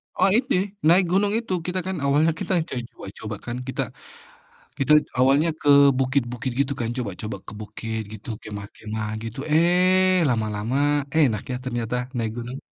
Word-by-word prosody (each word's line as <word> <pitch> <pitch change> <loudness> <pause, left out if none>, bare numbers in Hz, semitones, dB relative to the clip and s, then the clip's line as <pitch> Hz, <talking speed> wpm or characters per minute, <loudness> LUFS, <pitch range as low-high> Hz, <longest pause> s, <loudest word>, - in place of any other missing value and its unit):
Oh - - +4
ini, 255 -2 +1 0.3
naik 180 +2 +6
gunung 200 +2 +2
itu, 230 -5 -3
kita 185 +1 -1
kan 190 - -2
awalnya 150 +4 +3
kita - - -2 0.2
cari 125 - -3
coba-coba 105 +2 -8
kan, 120 0 -4
kita 130 - -2 1.0
kita 135 +1 +3 0.3
awalnya 140 +5 +4
ke 145 - -1 0.3
bukit-bukit 130 -2 -1
gitu 140 0 +1
kan, 115 - -1
coba-coba 105 -3 -4
ke - - -6
bukit 110 +1 -5
gitu, 110 +2 -10
kemah-kemah, 105 +1 -6
gitu. 115 +1 -7
Eh, 180 +3 +4
lama-lama 110 0 -1 0.4
enak 115 -9 +3
ya, 125 - -1
ternyata 120 -2 -3 0.2
naik 115 -2 -1
gunung. 120 +3 -6
125 Hz, 150 wpm, -24 LUFS, 110-165 Hz, 1.0 s, naik